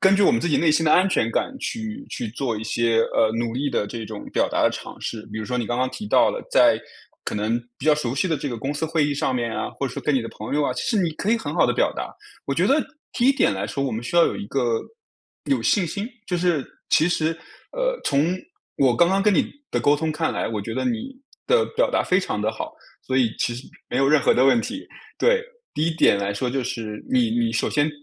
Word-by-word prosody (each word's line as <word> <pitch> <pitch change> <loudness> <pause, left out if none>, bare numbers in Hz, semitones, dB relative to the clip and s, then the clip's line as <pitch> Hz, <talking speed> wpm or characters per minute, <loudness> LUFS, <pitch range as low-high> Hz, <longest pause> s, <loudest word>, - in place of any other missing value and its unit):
根 190 0 +5
据 205 - +3
我 - - +6
们 230 - +1
自 175 - -1
己 150 - +3
内 165 - +3
心 155 +1 +2
的 - - +5
安 185 +2 +5
全 115 -11 +1
感 265 - -1
去 225 +2 -5
去 115 - -4
做 120 0 -2
一 105 - -5
些， 115 0 +2
呃， 110 - +3
努 115 -1 -1
力 140 +4 -1
的 110 -5 -1
这 115 0 -6
种 105 -1 -7
表 - - +2
达 - - 0
的 - - +4
尝 - - -8
试。 110 -2 -5
比 110 - -5
如 - - -4
说 125 +4 -2
你 115 - -2
刚 120 - -1
刚 130 +1 0
提 210 - -7
到 - - +4
了， - - -4
在 - - +5 0.4
可 - - -3
能 110 +3 0 0.2
比 130 - -9
较 155 - +5
熟 130 -5 -2
悉 140 - +1
的 160 - +1
这 140 - -3
个 120 - -4
公 135 +6 -3
司 160 +2 -2
会 160 -2 +1
议 145 - 0
上 135 -2 -1
面 115 -1 -2
啊， - - -2
或 140 - -3
者 125 - -6
说 - - -5
跟 150 - +1
你 130 - +2
的 115 - -5
朋 110 +6 -6
友 150 - +2
啊， 130 - 0
其 125 - -4
实 225 - 0
你 175 -5 +2
可 205 - -2
以 235 - +4
很 225 - -5
好 - - +3
地 - - +1
表 - - +2
达。 - - -4 0.4
我 140 - -1
觉 170 - +2
得 275 - +4 0.4
第 245 - +1
1 270 - +6
点 270 - +2
来 100 +1 -3
说， 140 +6 -3
我 135 - -1
们 110 +2 -3
需 120 - -6
要 170 -1 +7
有 - - 0
一 100 - -6
个， 120 -2 0 0.7
有 275 - +3
信 200 -5 +3
心。 200 +7 -4 0.2
就 180 - 0
是 170 -5 +1 0.3
其 160 - +4
实， 160 -2 +1 0.4
呃， - - -1
从 145 +5 +2 0.4
我 130 -3 +3
刚 170 - +5
刚 195 +1 +2
跟 205 -1 +3
你 - - +1 0.2
的 - - +1
沟 145 +1 +4
通 160 0 -1
看 160 +1 -1
来， - - -2
我 110 -3 -3
觉 115 - -5
得 - - -2
你 245 +1 -2 0.4
的 475 -1 +4
表 - - +2
达 - - +1
非 185 +1 +3
常 105 - -3
地 110 +1 0
好， 110 - -6 0.3
所 130 - -2
以 120 -4 +2
其 - - 0
实 120 +3 -8 0.2
没 - - -3
有 135 0 +3
任 150 0 +5
何 - - +4
的 125 - +3
问 185 - +5
题。 265 +4 -6 0.3
对。 480 -1 +3 0.3
第 155 - +1
1 165 - -2
点 100 - +5
来 100 0 -1
说， 125 +4 -1
就 135 0 -1
是 115 -4 -5
你 250 -3 +2
你 235 0 +1
首 - - 0
先 145 0 +2
145 Hz, 300 characters per minute, -23 LUFS, 120-195 Hz, 0.7 s, 要